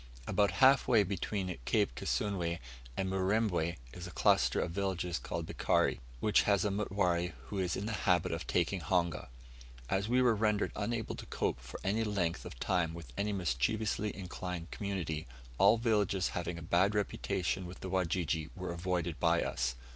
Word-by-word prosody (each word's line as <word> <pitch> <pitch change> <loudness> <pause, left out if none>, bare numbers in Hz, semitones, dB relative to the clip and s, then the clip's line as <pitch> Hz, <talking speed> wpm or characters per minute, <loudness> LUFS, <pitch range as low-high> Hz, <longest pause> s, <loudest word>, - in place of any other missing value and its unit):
About 100 0 +2
half 135 0 +6
way 115 -4 +5
between 95 -1 -2
Cape - - +2
Kisunwe 90 -5 -1 0.4
and 95 - 0
Murembwe, 95 -3 +1 0.2
is 90 0 -7
a - - -7
cluster - - +3
of 85 - -1
villages 90 -2 -1
called - - -4
Bikari, - - +1 0.2
which 105 - +4
has 100 0 +3
a 105 - +1
mutware 90 -4 0 0.2
who 100 - -3
is 90 -2 0
in 100 - -3
the 110 - -2 0.2
habit 90 -1 +3
of 80 -5 -4
taking 90 +2 +1
honga. 85 -3 0 0.6
As 100 +3 +1
we 125 +1 +4
were 120 -2 +5
rendered 105 -1 +1
unable 115 -2 -2
to - - -8
cope - - -1
for 65 +1 -9
any 105 +4 +1
length 95 -6 -1
of - - -9
time 85 -3 0
with 80 -8 -10
any 105 +1 0
mischievously 100 - 0
inclined 90 -2 -5
community, 90 - -3 0.3
all 100 +4 +7
villages 105 -5 +1
having 90 0 -3
a 85 - -7
bad 90 +5 +3
reputation 95 -3 -1
with 90 - -10
the 95 - -5
Wajiji 85 -3 0
were 90 -2 -4
avoided 85 -1 -2
by - - +3
us. 65 0 -1
95 Hz, 170 wpm, -33 LUFS, 85-100 Hz, 0.6 s, all